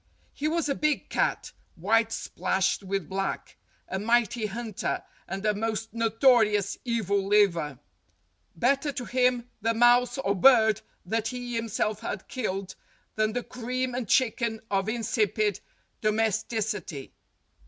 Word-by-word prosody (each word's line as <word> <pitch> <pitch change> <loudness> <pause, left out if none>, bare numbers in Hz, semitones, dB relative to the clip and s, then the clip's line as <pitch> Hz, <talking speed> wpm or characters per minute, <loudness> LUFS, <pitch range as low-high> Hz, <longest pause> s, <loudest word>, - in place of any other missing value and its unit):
He 300 - -2
was 330 -1 0
a 280 - +1
big 305 +1 0
cat, - - 0 0.2
white 225 +6 +2
splashed 190 -1 -1
with 195 -3 -3
black, 195 +2 -3 0.3
a 190 - -3
mighty 230 0 +1
hunter, 220 0 -3 0.2
and 195 +3 -5
a 210 - +3
most 225 +1 -3
notorious 225 -3 +3
evil 205 -5 0
liver. 170 -9 +3 0.8
Better 275 +4 +1
to 250 -3 -5
him 250 0 +1
the 230 +2 +1
mouse 245 +1 +4
or 200 -7 0
bird 220 0 +5 0.2
that 225 +4 -1
he 245 -1 -5
himself 225 -2 -1
had 200 - -5
killed 195 -6 -3 0.4
than 215 0 0
the 245 0 -2
cream 250 +1 -3
and 245 -5 -4
chicken 235 -3 +2
of 195 +1 +1
insipid 215 -3 0 0.4
domesticity. 215 - -1
225 Hz, 130 wpm, -27 LUFS, 200-245 Hz, 0.8 s, bird